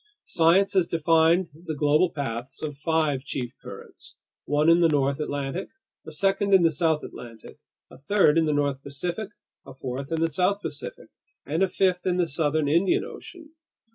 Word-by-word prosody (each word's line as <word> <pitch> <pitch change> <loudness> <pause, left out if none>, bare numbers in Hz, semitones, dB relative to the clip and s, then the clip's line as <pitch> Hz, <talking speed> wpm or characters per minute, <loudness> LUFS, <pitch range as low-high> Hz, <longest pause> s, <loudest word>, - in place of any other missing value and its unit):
Science 175 +4 +3
has 185 -3 +2
defined 165 +2 +3
the 160 0 -7
global 150 +4 +3
paths 130 -1 -5
of 150 -2 -4
five 150 -2 0
chief 130 -4 -5
currents: - - -10 0.3
one 150 +2 +1
in 165 +1 +6
the 170 - +6
north 140 -2 +1
Atlantic, 145 +4 -4 0.4
a - - -7
second 195 0 +2
in 185 - +5
the 165 - +4
south 160 -1 0
Atlantic, 115 -2 -11 0.3
a - - -14
third 160 0 +3
in 165 -1 +3
the - - +1
north 145 -2 0
Pacific, 170 +10 -5 0.3
a 135 - -12
fourth 135 +2 -6
in 165 - 0
the 165 - +2
south 185 +5 +1
Pacific, - - -7 0.4
and 160 +5 -2
a 195 - +4
fifth 185 0 0
in 180 -1 +1
the 180 - +2
southern 155 -1 0
Indian 170 +6 +2
Ocean. 325 -4 -12
160 Hz, 175 wpm, -25 LUFS, 140-180 Hz, 0.4 s, in